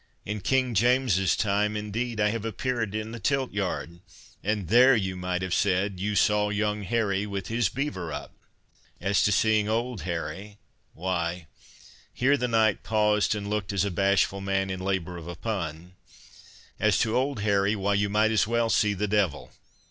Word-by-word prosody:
"In 105 Hz, 0 st, -4 dB
King 130 Hz, 0 st, +1 dB
James's 115 Hz, -4 st, +3 dB
time, 105 Hz, +1 st, 0 dB
indeed, 110 Hz, +2 st, -3 dB
I 105 Hz, 0 st, +3 dB
have 110 Hz, 0 st, -3 dB
appeared 115 Hz, -1 st, -2 dB
in 110 Hz, +1 st, -4 dB
the 115 Hz, -, -7 dB
tilt 135 Hz, +1 st, 0 dB
yard, 90 Hz, -4 st, -3 dB, 0.4 s
and 105 Hz, -3 st, -1 dB
there 125 Hz, +6 st, +6 dB
you 95 Hz, -4 st, -1 dB
might 90 Hz, 0 st, -3 dB
have 95 Hz, -1 st, -2 dB
said— 95 Hz, 0 st, +1 dB
'You 105 Hz, +2 st, -1 dB
saw 105 Hz, 0 st, +3 dB
young 105 Hz, 0 st, -1 dB
Harry 100 Hz, -1 st, 0 dB
with 100 Hz, -3 st, -5 dB
his 115 Hz, -2 st, +1 dB
beaver 120 Hz, -, -4 dB
up.' 75 Hz, -, -7 dB, 0.7 s
"As 95 Hz, +2 st, +1 dB
to 105 Hz, -, +3 dB
seeing 110 Hz, 0 st, +2 dB
old 115 Hz, -2 st, -1 dB
Harry, 90 Hz, +5 st, -5 dB, 0.4 s
why"—Here 90 Hz, -, -3 dB
the 125 Hz, -3 st, -1 dB
knight 110 Hz, -3 st, +2 dB
paused, 105 Hz, -1 st, +2 dB
and 100 Hz, -1 st, -5 dB
looked 105 Hz, -1 st, -2 dB
as 100 Hz, -1 st, +1 dB
a 100 Hz, -, -2 dB
bashful 100 Hz, +1 st, +1 dB
man 95 Hz, 0 st, -1 dB
in 95 Hz, -, -4 dB
labour 95 Hz, -2 st, -2 dB
of 85 Hz, -1 st, -9 dB
a 85 Hz, -, -6 dB
pun—"As 90 Hz, +2 st, -5 dB
to 110 Hz, 0 st, +1 dB
old 130 Hz, -3 st, 0 dB
Harry—why, 100 Hz, 0 st, +1 dB
you 100 Hz, 0 st, +1 dB
might 105 Hz, +2 st, +2 dB
as 105 Hz, -2 st, +2 dB
well 115 Hz, 0 st, +1 dB
see 105 Hz, -1 st, +2 dB
the 105 Hz, +2 st, -1 dB
devil. 100 Hz, -8 st, 0 dB
105 Hz, 170 wpm, -26 LUFS, 95-110 Hz, 0.7 s, there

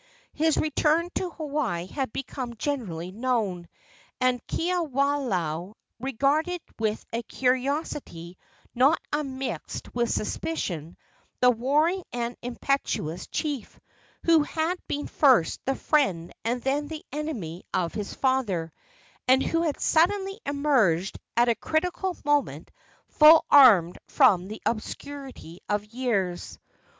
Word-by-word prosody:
His 320 Hz, 0 st, +2 dB
return 315 Hz, +3 st, +1 dB
to 370 Hz, -, -2 dB
Hawaii 285 Hz, -, -2 dB
had 265 Hz, +5 st, -4 dB
become 255 Hz, -2 st, -5 dB
generally 210 Hz, -, -3 dB
known, 210 Hz, -6 st, -1 dB, 0.5 s
and 255 Hz, -1 st, +1 dB
Kiwalao 270 Hz, -, -1 dB, 0.2 s
regarded 280 Hz, +8 st, 0 dB, 0.2 s
with 215 Hz, -1 st, -1 dB
a 230 Hz, -, -1 dB
curiosity 255 Hz, -, -2 dB, 0.4 s
not 270 Hz, +6 st, +4 dB
unmixed 270 Hz, -3 st, -4 dB
with 240 Hz, -1 st, 0 dB
suspicion 175 Hz, -, -3 dB, 0.4 s
the 250 Hz, 0 st, +6 dB
warring 300 Hz, +10 st, +1 dB
and 240 Hz, 0 st, -3 dB
impetuous 240 Hz, -, -2 dB
chief, 290 Hz, -7 st, -4 dB, 0.4 s
who 330 Hz, -2 st, +5 dB
had 320 Hz, +4 st, -1 dB
been 290 Hz, -, -3 dB
first 255 Hz, -, +3 dB
the 270 Hz, -, 0 dB
friend 190 Hz, -, 0 dB
and 240 Hz, +2 st, -1 dB
then 285 Hz, +2 st, 0 dB
the 310 Hz, 0 st, -7 dB
enemy 230 Hz, -, -4 dB
of 170 Hz, -2 st, -1 dB
his 210 Hz, -2 st, -5 dB
father, 210 Hz, -, 0 dB, 0.5 s
and 260 Hz, +1 st, +5 dB
who 330 Hz, -, 0 dB
had 315 Hz, -4 st, -1 dB
suddenly 390 Hz, +5 st, +2 dB
emerged 255 Hz, -, +1 dB, 0.2 s
at 240 Hz, +1 st, +5 dB
a 235 Hz, -, +4 dB
critical 355 Hz, -, -2 dB
moment 290 Hz, -1 st, 0 dB, 0.4 s
full 310 Hz, +1 st, +7 dB
armed 210 Hz, -12 st, +7 dB
from 185 Hz, -1 st, +4 dB
the 215 Hz, +2 st, -8 dB
obscurity 260 Hz, -, -5 dB
of 205 Hz, 0 st, 0 dB
years. 210 Hz, -6 st, -2 dB
260 Hz, 115 wpm, -26 LUFS, 210-300 Hz, 0.5 s, full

